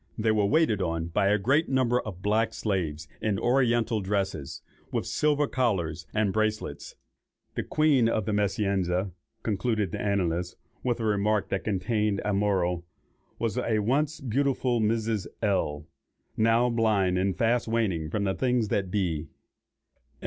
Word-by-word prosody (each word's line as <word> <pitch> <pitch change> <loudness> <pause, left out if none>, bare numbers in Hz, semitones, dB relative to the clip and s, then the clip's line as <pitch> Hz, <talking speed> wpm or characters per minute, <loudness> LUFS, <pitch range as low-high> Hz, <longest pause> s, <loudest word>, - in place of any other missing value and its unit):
They 110 0 +2
were 105 -2 +2
waited 140 -7 +2
on 85 -1 -2
by 90 +3 +1
a 105 +1 +4
great 140 - +2
number 130 -2 +2
of 95 -4 -8
black 110 +2 +1
slaves 80 -7 -2
in 105 -2 0
oriental 120 -2 +2
dresses, 95 -7 -2 0.3
with - - -1
silver 150 -1 +1
collars 90 - -1
and 105 -3 +1
bracelets. 110 0 -2 0.6
The - - -2
queen 145 -7 +3
of 110 -3 0
the 110 - -1
"Meschianza," 100 -2 0 0.3
concludes 110 -3 0
the - - -4
annalist, 90 -3 -1 0.3
with 120 -2 0
a 115 - -2
remark 105 0 +1
which 100 - -1
contains 105 0 0
a 105 - +1
moral, 95 -4 +1 0.5
"was 115 -4 -1
a 110 -2 0
once 140 +8 0
beautiful 130 -1 0
Mrs. 110 -1 0 0.2
L——, 75 -8 0 0.5
now 115 +2 +3
blind 105 -6 +2
and 95 0 0
fast 120 +1 +1
waning 100 -9 0
from 100 +5 -1
the 95 -1 +1
things 125 -3 0
that 95 -2 0
be." 85 -6 -1
105 Hz, 150 wpm, -27 LUFS, 95-115 Hz, 0.6 s, a